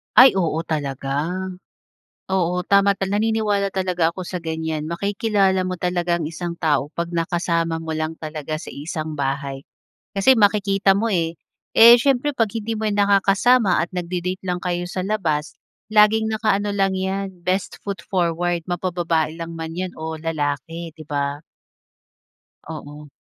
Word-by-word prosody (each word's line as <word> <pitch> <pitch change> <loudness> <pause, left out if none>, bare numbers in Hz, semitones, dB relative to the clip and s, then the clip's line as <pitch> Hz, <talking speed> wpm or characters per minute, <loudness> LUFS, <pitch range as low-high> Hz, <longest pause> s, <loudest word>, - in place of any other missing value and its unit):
Ay, 255 -6 +8
oo 165 -3 0
talaga. 140 -2 -2 1.1
Oo 180 -1 +1
tama 200 +1 +4
tal 195 0 -3
naniniwala 210 -1 +1
talaga 180 -3 0
ako 185 - -5
sa 180 0 -5
ganyan. 160 -2 -3
Makikilala 195 +1 +1
mo 185 - -2
talaga 175 0 0
ang 170 - -3
isang 170 +2 -4
tao 145 -4 +1
kapag 170 0 -3
nakasama 165 -1 -1
mo 160 - -4
lang 155 +1 -2
talaga 155 -1 -5
sa 155 - -7
iisang 155 +1 -5
bahay. 140 -1 -3 0.5
Kasi 230 +5 +5
makikita 200 -1 +3
mo, 225 +2 0
eh. 165 -2 0 0.4
Eh, 235 +1 +10
siyempre 275 +2 +2
kapag 225 -3 -1
hindi 225 +1 -2
mo 220 - -1
nakakasama 200 +1 +3
at 175 - -7
nagdi-date 180 +1 -3
lang 180 0 -1
kayo 175 -1 -2
sa 185 +1 -3
labas, 170 -7 -1 0.3
laging 220 +1 +4
nakaano 210 -2 +1
lang 195 -1 +1
iyan, 190 -1 -3
best 185 +1 -1
foot 200 -1 -4
forward, 175 -1 0
mapa-babae 170 -3 -1
lang 165 0 -6
man 160 0 -6
iyan 185 0 -3
o 160 0 -4
lalaki, 160 +1 -3
'di 155 - -10
ba? 145 +1 -2 1.3
Oo. 150 -1 -8
175 Hz, 145 wpm, -22 LUFS, 160-200 Hz, 1.3 s, Eh